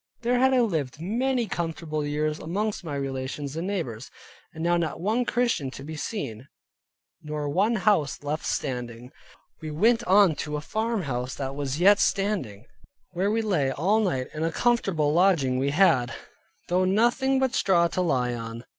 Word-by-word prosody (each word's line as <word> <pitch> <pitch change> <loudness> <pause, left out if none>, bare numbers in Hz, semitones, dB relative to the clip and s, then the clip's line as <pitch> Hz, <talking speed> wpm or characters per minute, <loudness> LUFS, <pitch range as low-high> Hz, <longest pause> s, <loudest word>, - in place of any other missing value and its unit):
There 245 +1 +2
had 265 +1 +4
I 255 -1 +4
lived 155 - -1
many 240 +7 0
comfortable 165 -4 -3
years 150 +1 -1
amongst 205 +5 -3
my 150 -4 -5
relations 135 +1 -4
and 165 +3 -3
neighbors, 130 - -4 0.4
and 160 0 -7
now 175 +1 +3
not 165 -2 -2
one 220 +7 0
Christian 235 - 0
to 135 - -9
be 155 +2 -7
seen, 135 - -5 0.7
nor 150 -1 -4
one 200 +10 +2
house 190 -10 +1
left 150 +2 -3
standing. 125 -1 -4 0.5
We 155 - -5
went 225 +10 +2
on 195 -3 +5
to 150 0 -3
a - - -3
farmhouse 155 - -2
that 135 -1 -4
was 140 0 -3
yet 200 +3 +6
standing, 180 - -1 0.5
where 185 +3 0
we 225 +1 0
lay 160 -11 +1
all 185 - +2
night, 170 -12 -1
and 155 +1 -3
a 165 - 0
comfortable 180 -9 +1
lodging 160 -8 +3
we 135 +2 +1
had, 140 -6 +3 0.5
though 180 +1 +2
nothing 240 +8 +2
but 265 -1 +1
straw 175 -3 +3
to 185 - -1
lie 125 -8 +1
on. 115 0 -7
165 Hz, 170 wpm, -26 LUFS, 140-205 Hz, 0.7 s, yet